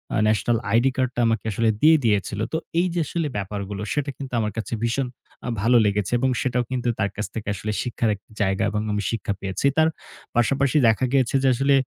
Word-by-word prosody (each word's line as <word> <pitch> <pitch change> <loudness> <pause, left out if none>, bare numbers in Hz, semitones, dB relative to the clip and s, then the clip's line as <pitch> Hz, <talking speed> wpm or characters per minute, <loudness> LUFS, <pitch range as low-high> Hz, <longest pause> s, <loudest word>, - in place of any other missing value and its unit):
আ - - +1
national 110 +2 +2
ID 120 +4 +4
card 130 -1 0
টা 120 - +3 0.3
আসলে 115 +3 +1
দিয়ে 160 +1 +7
দিয়েছিল। 100 -2 +1
তো - - +2 0.2
এই 180 - +3
যে 175 - 0
আসলে 165 -1 -1
ব্যাপারগুলো 100 0 -4
সেটা 145 -1 -1
কিন্তু 135 -2 -7
আমার 105 -1 -1
কাছে 115 - -4
ভীষণ 125 +3 0 0.4
আ - - -4
ভালো 120 +3 +5
লেগেছে। 100 -1 0
এবং 130 - +2
সেটাও 125 -2 0
কিন্তু 125 -1 -1
তার 100 - +1
কাছ 105 - -2
থেকে 110 -2 -4 0.3
শিক্ষার 120 -2 -1
একটা 100 - -22
জায়গা 95 -1 +1
এবং 105 0 -1 0.3
শিক্ষা 110 -3 -2
পেয়েছি। 95 +6 -3
তার 160 0 +5 0.5
পাশাপাশি 135 +4 +2
দেখা 115 +3 +3
গেছে 130 -1 +2
যে, - - +4
আসলে 135 +3 +3
120 Hz, 195 wpm, -23 LUFS, 105-135 Hz, 0.5 s, দিয়ে